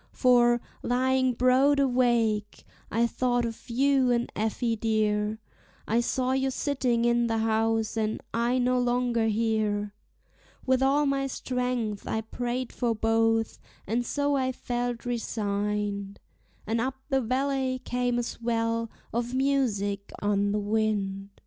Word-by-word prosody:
For, 240 -1 +4 0.2
lying 260 +1 +1
broad 260 +4 +4
awake, 240 -5 +1 0.3
T 230 +2 +2
thought 245 0 0
of 230 +1 -7
you 265 +1 +3
and 240 0 0
Effie 225 +2 0
dear; 215 -1 0 0.5
I 225 +2 +2
saw 255 +2 0
you 265 0 +1
sitting 255 -4 0
in 240 0 +3
the 225 -1 0
house, 225 0 +1
and 220 -1 -1
I 235 +2 +1
no 250 0 +2
longer 245 -2 +1
here; 215 -2 0 0.7
With 260 0 +2
all 280 +2 +3
my 275 -1 0
strength 250 -5 -2
I 220 - -1
prayed 245 +2 -4
for 235 -2 0
both, 225 0 +1 0.3
and 235 +3 0
so 285 +3 0
I 260 -1 +1
felt 245 -1 -3
resigned, 205 -3 -2 0.5
And 225 +2 0
up 260 +2 -1
the 270 -2 +2
valley 260 +1 0
came 245 0 0
a 240 - 0
swell 230 -1 -1 0.2
of 240 +2 -2
music 220 -8 0
on 205 0 +1
the 210 - 0
wind. 205 -2 -1
235 Hz, 135 wpm, -27 LUFS, 220-255 Hz, 0.7 s, For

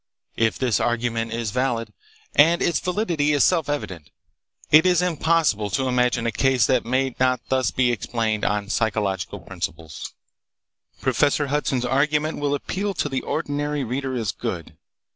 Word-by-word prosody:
"If 115 -1 +1
this 125 -5 +1
argument 115 -1 -1
is 115 -2 -2
valid—and 150 - 0
its 170 - +1
validity 175 -6 0
is 145 - +4
self 165 -5 +2
evident—it 145 - -1
is 180 -2 +3
impossible 160 - +1
to 130 +7 0
imagine 125 -1 +1
a 115 - +1
case 130 +1 +2
that 130 -2 +2
may 130 +2 0
not 130 0 +2
be - - -43
thus 130 -1 +1
explained 115 -3 0
on 105 -1 -1
psychological 105 -4 -1
principles." 80 -2 -6 0.9
Professor 145 +1 +2
Hudson's 135 -4 0
argument 150 +5 +1
will 145 -1 0
appeal 195 +7 -3
to 150 - -1
the 135 -1 -2
ordinary 145 -2 -2
reader 130 +2 -3
as 110 -5 -1
good. 90 -9 -5
130 Hz, 145 wpm, -23 LUFS, 115-150 Hz, 0.9 s, is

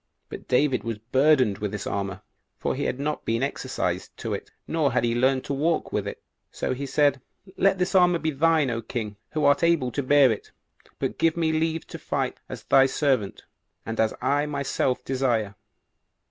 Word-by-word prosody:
But - - -9
David 130 0 +2
was 115 -2 -3
burdened 130 -1 +2
with 105 -1 -3
his 105 - -4
armor, 100 -1 -3 0.3
for - - -1
he - - -3
had 125 - -2
not 150 +2 -2
been 115 +3 0
exercised 140 - -3
to - - -4
it, - - -5 0.2
nor 155 -5 +1
had 125 - +2
he 120 -1 +1
learned 130 +2 +2
to - - -3
walk 155 +4 0
with - - -1
it; - - -7 0.3
so - - -2
he 140 +2 -5
said, 140 -1 +2 0.3
"Let 195 0 +3
this 180 0 -1
armor 180 -2 +5
be 160 -1 -1
thine, 155 -1 +2
O 115 0 -2
king, 110 -3 -5 0.2
who 155 -1 0
art 145 0 +4
able 165 -7 +2
to 140 - -1
bear 140 -1 +5
it; 110 - -5 0.5
but - - -3
give 165 0 +2
me 160 -2 +1
leave 160 0 -1
to - - -9
fight - - -2
as - - -7
thy 135 0 +5
servant, 130 -8 0 0.4
and 115 0 -5
as 110 -1 +3
I 145 +1 +1
myself 140 -3 -1
desire." 120 -6 0
135 Hz, 195 wpm, -25 LUFS, 115-155 Hz, 0.5 s, armor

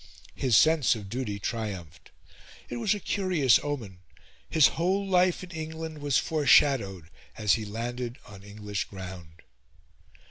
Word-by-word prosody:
His 125 -5 +2
sense 155 -6 +4
of 105 -3 -8
duty 120 -3 -3
triumphed. 100 - -5 0.6
It 120 - -4
was 190 - +1
a - - -5
curious 180 - +2
omen: 115 -11 -5 0.5
his 155 -4 +5
whole 190 +4 0
life 185 -1 +2
in 180 - -10
England 160 -1 -6
was 145 -2 +1
foreshadowed 130 - +2 0.3
as 105 -2 +3
he 110 - -1
landed 120 +3 -5
on 100 -2 -12
English 105 0 -5
ground. 90 -4 -10
120 Hz, 135 wpm, -27 LUFS, 100-160 Hz, 0.6 s, his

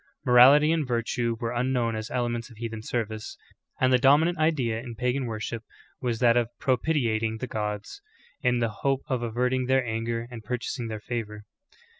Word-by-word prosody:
Morality 135 +5 +7
and 160 -4 0
virtue 115 -1 -1
were 115 -2 -2
unknown 120 -1 0
as 110 +1 -5
elements 120 -1 -2
of 115 - -15
heathen 115 -1 -5
service; 110 -1 -4 0.4
and 130 0 +3
the 125 - +5
dominant 150 +6 +4
idea 135 -8 +1
in 120 -1 -8
pagan 125 +3 -1
worship 115 0 -4 0.4
was 120 -2 -1
that 120 0 +4
of 120 -2 +2
pro 130 - +2
pitiating 115 -7 0
the 130 - -4
gods, 105 - -4 0.4
in 125 -3 +2
the 115 -2 -1
hope 135 -1 +1
of 130 -3 0
averting 125 +2 0
their 130 -1 +3
anger 115 +1 -2
and 115 -2 -8
purchasing 125 +1 -3
their 110 -1 -5
favor. 105 -1 -5
120 Hz, 175 wpm, -26 LUFS, 115-130 Hz, 0.4 s, Morality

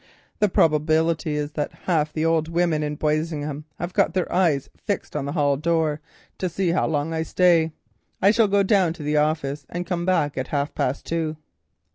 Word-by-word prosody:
The 210 - +3
probability 155 0 +2
is 150 0 -2
that 150 -1 -3
half 155 -4 +1
the 155 +1 -1
old 165 -1 +2
women 165 -2 +1
in 150 0 -3
Boisingham 150 -1 -2
have 175 +2 -5
got 195 -1 +2
their 185 - -1
eyes 165 -7 +2
fixed 200 -6 -4
on 145 -2 -2
the 140 - -3
hall 145 -4 +2
door 160 -1 0 0.4
to 185 - -1
see 180 +1 -1
how 175 - +1
long 155 +1 -1
I 160 - -1
stay. 165 -1 +3 0.5
I 200 - +5
shall 225 -1 +3
go 200 0 +3
down 190 -4 +3
to 160 - -9
the 150 +1 0
office 150 -1 0
and 175 0 -4
come 175 -1 -2
back 165 -7 +1
at 130 - -3
half 145 0 -2
past 130 +3 -2
two." 160 -2 -2
160 Hz, 195 wpm, -23 LUFS, 150-175 Hz, 0.5 s, I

